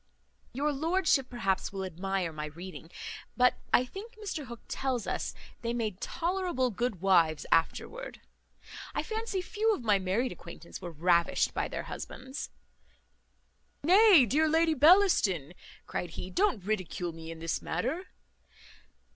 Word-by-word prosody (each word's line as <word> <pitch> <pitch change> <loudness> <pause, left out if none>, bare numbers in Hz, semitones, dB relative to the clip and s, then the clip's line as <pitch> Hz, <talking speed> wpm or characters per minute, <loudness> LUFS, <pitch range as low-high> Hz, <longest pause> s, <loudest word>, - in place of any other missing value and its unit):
Your 290 +4 0
lordship, 315 -2 +2
perhaps, 195 -6 -1
will 195 -1 -4
admire 185 -1 -2
my 150 0 -4
reading; 170 +1 -9 0.5
but 250 0 +4
I 250 - +5
think 420 - -9
Mr 390 -9 -5
Hook 235 -1 -9
tells 260 -4 -2
us, - - -3 0.3
they 235 0 -2
made 215 -5 -2
tolerable 345 -8 -1
good 220 -4 -2
wives 170 -5 +3
afterwards. 475 - 0 0.8
I - - 0
fancy 440 -4 -3
few 435 +2 +1
of 255 - -8
my 205 -3 +4
married 195 +7 0
acquaintance 170 -1 -10
were 175 - -5
ravished 170 +1 +2
by - - -1
their - - -4
husbands." 65 - -7 1.3
"Nay, 370 - +7
dear 310 +7 +2
Lady 325 +1 +3
Bellaston," 290 - +4 0.3
cried 175 - -3
he, 180 +3 -7
"don't 365 - +1
ridicule 185 -4 -2
me 160 0 -9
in 165 - -6
this 165 0 -2
manner." 320 +10 -2
235 Hz, 140 wpm, -30 LUFS, -, 1.3 s, Nay